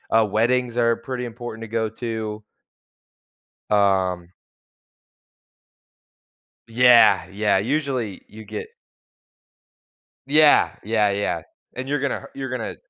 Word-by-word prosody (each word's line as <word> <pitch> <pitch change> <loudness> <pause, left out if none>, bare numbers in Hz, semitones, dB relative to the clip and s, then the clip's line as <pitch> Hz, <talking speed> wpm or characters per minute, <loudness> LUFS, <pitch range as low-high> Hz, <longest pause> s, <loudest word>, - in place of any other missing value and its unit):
uh, 115 -1 +5
weddings 120 +3 0
are 115 -1 +3
pretty 125 +1 -5
important 115 -1 -8
to - - -7
go 110 0 -1
to. 110 -2 -5 1.3
Um 95 -3 +1 2.3
Yeah, 115 -6 +5
yeah, 105 0 +1
usually 125 -3 -2
you 110 +1 -12
get 105 +1 -7 1.6
Yeah, 150 +1 +5
yeah, 105 -1 +1
yeah, 100 -4 -2 0.3
and 130 +1 -5
you're 145 0 -1
gonna 140 0 -3
you're 135 -1 -5
gonna 125 -3 -5
115 Hz, 100 wpm, -22 LUFS, 105-125 Hz, 2.3 s, uh